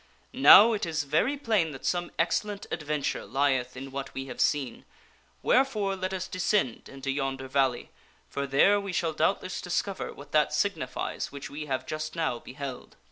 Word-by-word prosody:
Now, 235 -3 +9
it 210 - -2
is 160 -2 -1
very 160 - +1
plain 210 - +1
that 135 - -9
some 175 -1 0
ex 165 0 +2
cellent 205 -1 -7
adventure 150 -3 -2
lieth 130 -2 0
in 135 +1 -7
what 140 0 -6
we 135 - -4
have 125 -2 -5
seen, 135 -5 0 0.6
wherefore 215 -7 +2
let 185 0 -3
us 185 -1 -3
descend 185 - 0
into 135 0 -4
yonder 135 -1 -3
valley, 130 -2 0 0.4
for 140 0 -3
there 195 +10 +4
we 200 -2 -5
shall 165 -2 0
doubtless - - 0
discover - - -2
what - - -13
that - - +3
signifies - - -2
which 140 -1 -8
we 150 +1 -6
have 130 -2 -2
just 155 +1 -4
now 160 -8 -1
beheld. 130 0 -8
150 Hz, 175 wpm, -28 LUFS, 135-185 Hz, 0.6 s, Now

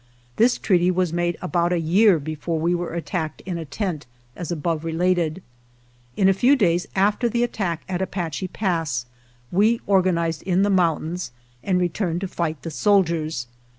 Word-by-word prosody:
This 240 +2 +4
treaty 180 -3 +2
was 180 -2 0
made 175 -1 0
about 175 -1 +1
a 175 - +1
year 185 +4 +4
before 155 +2 -3
we 170 +3 +1
were 175 -1 -3
at 170 - -4
tacked 160 -5 -3
in 180 -3 -4
a 165 - -5
tent, 155 - -4 0.3
as 175 -2 -5
above 165 -1 -2
related. 170 +1 0 0.7
In 190 - +4
a 195 - +5
few 245 +9 +4
days 175 -8 +1
after 205 +5 +2
the 235 +1 +1
attack 190 -8 -2
at 185 -1 -2
Apache 180 -2 -3
Pass 165 - -1 0.5
we 215 +5 +3
or 195 -1 +4
ganized 170 -3 0
in 185 +1 +1
the 205 - +2
mountains 175 -2 0 0.3
and 185 -2 +1
returned 175 0 -1
to 195 - -2
fight 160 -6 -3
the 165 - -5
soldiers. 165 - +1
175 Hz, 175 wpm, -23 LUFS, 165-190 Hz, 0.7 s, a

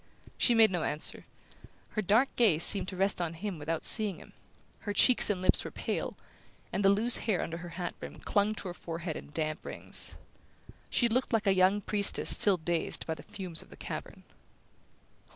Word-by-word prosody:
She 240 - +2
made 225 -2 +5
no 175 -3 -2
answer. 150 0 0 0.6
Her 215 - -3
dark 220 +7 +1
gaze 190 -10 +3
seemed 195 -2 +2
to 185 - -5
rest 190 0 0
on 165 -1 -4
him 185 -1 -6
without 160 +2 -4
seeing 210 -5 +5
him. - - -16 0.5
Her 205 - -5
cheeks 245 +4 +3
and 185 -3 -2
lips - - +2
were - - -6
pale, - - -5 0.6
and 200 - -1
the 195 - +5
loose 220 +5 +5
hair 215 -5 -1
under 165 - -6
her 175 0 -9
hat 175 -2 -4
brim - - -9
clung 205 +1 -1
to 200 - -7
her - - -6
forehead 165 -1 -6
in - - -9
damp 155 0 -3
rings. - - 0 0.7
She 240 - +1
looked 250 +2 -1
like 225 -1 +1
a 195 - +3
young 190 +2 +2
priestess 205 0 +4
still 200 -3 +5
dazed 170 0 -3
by 160 - -3
the - - -11
fumes 180 -5 -8
of - - -18
the - - -15
cavern. - - -8
190 Hz, 195 wpm, -29 LUFS, 170-215 Hz, 0.7 s, made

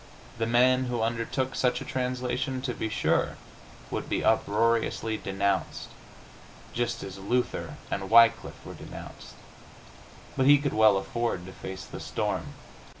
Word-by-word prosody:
The 115 - 0
man 125 +2 +4
who 120 -2 -1
undertook 115 +3 -1
such 125 -1 +1
a - - -7
translation, 130 +1 -2
to 125 -2 -2
be 110 - -3
sure, 110 - +1 0.5
would - - -3
be - - 0
uproariously 110 +1 +2
denounced, 95 0 -1 0.8
just 120 -1 -2
as 95 0 -7
Luther 120 +6 -1 0.2
and 95 -1 -3
Wycliffe 115 0 +4
were - - -8
denounced, - - -10 1.0
but 130 - +2
he 145 0 +8
could 145 0 -2
well 110 -2 +5
afford 95 -2 -2
to 95 - -9
face 95 +1 -7
the - - -8
storm. - - -3
115 Hz, 140 wpm, -28 LUFS, 105-125 Hz, 1.0 s, he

